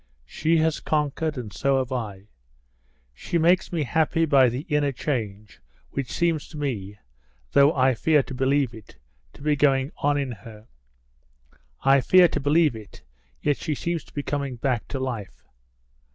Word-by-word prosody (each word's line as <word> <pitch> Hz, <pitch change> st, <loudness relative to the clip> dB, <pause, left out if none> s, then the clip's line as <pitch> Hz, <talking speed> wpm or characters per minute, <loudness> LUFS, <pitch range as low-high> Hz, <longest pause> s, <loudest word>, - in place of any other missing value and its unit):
She 160 Hz, -, 0 dB
has 160 Hz, 0 st, +1 dB
conquered, 150 Hz, 0 st, -1 dB
and 115 Hz, -5 st, -6 dB
so 135 Hz, 0 st, +1 dB
have 130 Hz, -1 st, -2 dB
I. 105 Hz, -6 st, -4 dB, 0.9 s
She 170 Hz, -, -3 dB
makes 175 Hz, +3 st, +3 dB
me 165 Hz, -4 st, -1 dB
happy 160 Hz, +4 st, +1 dB
by 135 Hz, -5 st, +5 dB
the 125 Hz, +3 st, -4 dB
inner 150 Hz, -3 st, 0 dB
change, 110 Hz, -7 st, -4 dB, 0.3 s
which 135 Hz, -3 st, -4 dB
seems 165 Hz, -3 st, 0 dB
to 155 Hz, -, -11 dB
me, 105 Hz, -9 st, -4 dB, 0.5 s
though 140 Hz, +1 st, +5 dB
I 130 Hz, -1 st, +3 dB
fear 150 Hz, +4 st, +2 dB
to -, -, -9 dB
believe 135 Hz, -1 st, +1 dB
it, 110 Hz, -3 st, -14 dB, 0.4 s
to -, -, -14 dB
be 150 Hz, 0 st, +2 dB
going 135 Hz, -1 st, +2 dB
on 145 Hz, 0 st, +1 dB
in 140 Hz, -3 st, -2 dB
her. 110 Hz, 0 st, -12 dB, 1.2 s
I 135 Hz, 0 st, +5 dB
fear 185 Hz, +5 st, +6 dB
to -, -, -2 dB
believe 150 Hz, -1 st, +3 dB
it, 110 Hz, -3 st, -12 dB, 0.4 s
yet 145 Hz, -1 st, +1 dB
she 155 Hz, -, -3 dB
seems 170 Hz, +2 st, -3 dB
to -, -, -20 dB
be 145 Hz, -, -3 dB
coming 140 Hz, -3 st, -3 dB
back 120 Hz, -1 st, -2 dB
to 135 Hz, -, -4 dB
life." 120 Hz, -7 st, -5 dB
140 Hz, 165 wpm, -24 LUFS, 125-150 Hz, 1.2 s, fear